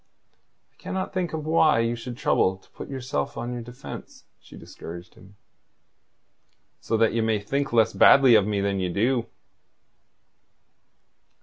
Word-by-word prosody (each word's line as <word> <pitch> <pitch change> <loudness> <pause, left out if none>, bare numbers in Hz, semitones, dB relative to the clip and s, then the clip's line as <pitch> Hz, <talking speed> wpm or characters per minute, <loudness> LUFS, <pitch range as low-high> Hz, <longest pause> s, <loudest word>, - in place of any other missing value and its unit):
"I - - -40
cannot 190 0 -5
think 185 -2 -1
why 155 -2 +2
you 115 +1 -1
should 120 +1 -8
trouble 95 -8 +1
to 95 - -27
put - - -10
yourself 135 +1 -4
on 120 +1 -4
your 120 - -5
defence," 120 +3 -10 0.2
she - - -15
discouraged 85 +2 -10
him. 100 +1 -18 1.4
"So 115 - -1
that 115 0 +2
ye 115 - 0
may 110 -1 +1
think 135 +8 -2
less 115 -1 +3
badly 135 -3 +6
of 105 -3 +4
me 105 -2 -1
than 100 -1 -1
you 90 -1 -1
do." 115 +6 0
115 Hz, 145 wpm, -25 LUFS, 105-135 Hz, 1.4 s, badly